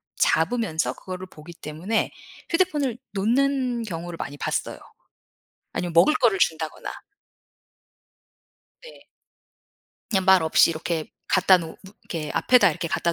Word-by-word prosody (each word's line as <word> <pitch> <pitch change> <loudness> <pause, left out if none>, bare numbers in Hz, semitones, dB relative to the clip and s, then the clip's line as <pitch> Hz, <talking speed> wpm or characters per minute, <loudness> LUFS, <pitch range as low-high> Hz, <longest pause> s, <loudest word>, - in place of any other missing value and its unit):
잡으면서 165 -2 +1
그거를 185 0 -8
보기 165 -1 -13
때문에 165 +8 -2 0.4
휴대폰을 300 -9 +1 0.2
놓는 245 +3 +1
경우를 175 -4 -6
많이 145 -2 -6
봤어요. - - -3 0.9
아니면 175 -1 -3
먹을 170 - +6
거를 230 -9 +3
준다거나. 160 -2 -1 1.9
네. - - -14 1.0
그냥 190 -4 +1
말 190 -2 +6
없이 160 +1 +4
이렇게 160 0 -3 0.2
갖다 185 0 +5
놓으 165 -2 -6
므 - - -17 0.3
이렇게 155 -3 -5
앞에다 245 -7 +4
이렇게 165 +2 -4
갖다 170 +1 0
185 Hz, 285 characters per minute, -24 LUFS, 165-235 Hz, 1.9 s, 먹을